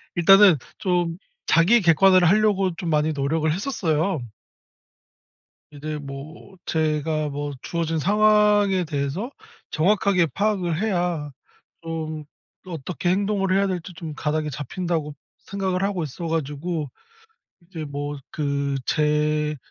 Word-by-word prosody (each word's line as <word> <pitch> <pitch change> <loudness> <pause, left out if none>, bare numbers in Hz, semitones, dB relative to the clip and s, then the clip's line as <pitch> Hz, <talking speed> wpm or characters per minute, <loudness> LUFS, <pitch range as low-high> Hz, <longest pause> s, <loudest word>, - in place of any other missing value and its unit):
일단은 195 0 +7 0.2
좀 175 -2 0 0.3
자기 200 +8 +5
객관화를 180 +1 +5
하려고 195 -3 +2
좀 175 -2 -4
많이 155 0 +2
노력을 155 +3 0
했었어요. 170 - -1 1.5
이제 150 +1 -5
뭐 145 +7 -10
제가 155 -1 0
뭐 145 0 -4
'주어진 165 -2 -2
상황에 210 -1 +4
대해서 150 - -3 0.4
정확하게 185 +1 +2
파악을 190 -5 0
해야 175 -8 -1 0.5
좀 160 -2 -5 0.4
또 185 - -10
어떻게 165 +3 -4
행동을 195 0 +1
해야 200 0 +3
될지 180 -1 -4
좀 160 -2 -7
가닥이 150 0 -2
잡힌다.'고 150 +1 -3 0.2
생각을 190 -2 -3
하고 195 -4 -1
있어 165 +4 -6
가지고 155 -1 -3 0.7
이제 170 -2 -8
뭐 145 0 -5
그 140 -2 -1
제 150 0 +1
165 Hz, 250 characters per minute, -23 LUFS, 150-190 Hz, 1.5 s, 일단은